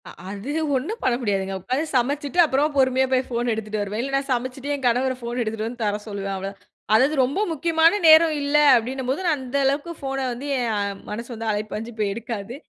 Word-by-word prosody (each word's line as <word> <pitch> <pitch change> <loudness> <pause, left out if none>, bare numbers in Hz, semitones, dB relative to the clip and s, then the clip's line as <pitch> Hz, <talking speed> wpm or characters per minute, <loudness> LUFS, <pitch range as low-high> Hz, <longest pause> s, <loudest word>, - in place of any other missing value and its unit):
அ - - -9 0.2
அது 205 +7 -5 0.2
ஒண்ணும் 320 - -3
பண்ண 250 - +2
முடியாதுங்க, 195 -3 -1
உட்கார்ந்து 260 - -1
சமைச்சுட்டு, 285 +6 0
அப்புறம் 290 +1 +1
பொறுமையா 260 0 +3
போய் 260 0 +2
ஃபோன் 240 0 -1
எடுத்துட்டு 215 -1 -4
வருவேன், 205 +2 -3
இல்ல 275 +1 -4
நான் 275 +1 -1
சமைச்சுட்டு 255 +3 -3
என் 270 -2 -6
கணவர 250 +2 +2
ஃபோன் 240 0 -3
எடுத்துட்டு 220 -1 -2
வந்து 240 +1 -8
தர 205 -1 0
சொல்லுவேன். 200 -1 -4
அவ்வளோதான், 195 +1 -6 0.3
அதாவது 265 +8 +4
ரொம்ப 270 +9 -1
முக்கியமான 330 +4 +3
நேரம் 315 0 +7
இல்ல 285 +1 +2 0.2
அப்படின்னும்போது, 260 +5 -2
நான் 315 -3 +2
அந்த 260 +1 -3
அளவுக்கு 285 +5 0
ஃபோன 270 -1 -3
வந்து 250 +4 -6
என் 205 -4 -2
மனசு 235 +4 -5
வந்து 225 0 -3
அலைபாஞ்சு 215 +2 -4
போய் 205 -2 +1
எடுக்காது. 230 -1 -6
250 Hz, 195 wpm, -23 LUFS, 215-280 Hz, 0.3 s, நேரம்